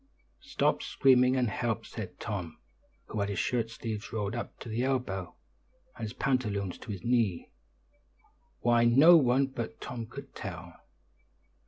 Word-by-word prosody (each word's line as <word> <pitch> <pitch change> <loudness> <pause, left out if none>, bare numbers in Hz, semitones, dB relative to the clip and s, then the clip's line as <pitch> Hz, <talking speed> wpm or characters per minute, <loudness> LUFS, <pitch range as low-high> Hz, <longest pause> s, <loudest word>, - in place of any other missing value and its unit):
"Stop - - +1
screaming, 130 -1 +4
and 125 -2 +2
help," 110 0 -2
said - - -8
Tom, 90 -7 -4 0.5
who 110 - -5
had 100 0 0
his 100 - -3
shirt 115 -2 0
sleeves 115 -2 -5
rolled 105 -2 -2
up 120 - -5
to - - -8
the 115 +1 -2
elbow, 125 -9 -2 0.6
and - - -11
his 110 -1 -4
pantaloons 105 -8 -1
to 115 - -7
his 95 -3 -6
knee 115 -7 +1 1.1
why, 120 0 +4
no 135 +9 +8
one 135 -3 +4
but 120 -4 -6
Tom 120 -2 -6
could 135 +3 -10
tell. 85 -4 -7
115 Hz, 150 wpm, -30 LUFS, 105-125 Hz, 1.1 s, no